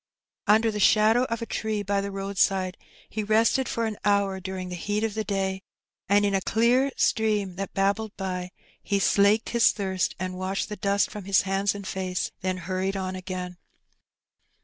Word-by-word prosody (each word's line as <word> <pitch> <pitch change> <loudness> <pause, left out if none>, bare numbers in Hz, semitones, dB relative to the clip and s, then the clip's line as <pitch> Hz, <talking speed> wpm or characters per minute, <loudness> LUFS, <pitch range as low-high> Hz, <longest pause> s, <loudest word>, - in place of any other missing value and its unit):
Under 220 +2 +4
the 210 - -4
shadow 220 +4 +4
of 230 -1 -3
a - - -3
tree 215 -2 -2
by 200 0 0
the 200 - -4
roadside 195 -1 0 0.3
he 215 - -4
rested 225 +5 +2
for 230 - -1
an 215 -2 -3
hour 200 -1 +2
during 185 -1 -5
the 180 - -5
heat 205 +5 -2
of 225 -2 -1
the 220 +1 -2
day, 190 -2 -2 0.5
and 205 +1 +4
in 200 - +1
a 195 - +2
clear 245 +7 +2
stream 210 -4 +1
that 195 -1 -5
babbled 200 +2 0
by, 185 -2 -3 0.3
he 200 - 0
slaked 200 +2 +3
his 235 -1 +5
thirst 190 -3 -2
and 185 0 -3
washed 190 +2 -2
the 210 - -4
dust 200 0 +1
from 210 -3 -7
his 195 -1 +3
hands 195 +1 0
and 200 -1 -7
face, 185 -1 -3
then 185 0 -1
hurried 185 +2 -2
on 185 -1 -3
again. 180 -1 -6
200 Hz, 185 wpm, -26 LUFS, 190-215 Hz, 0.5 s, his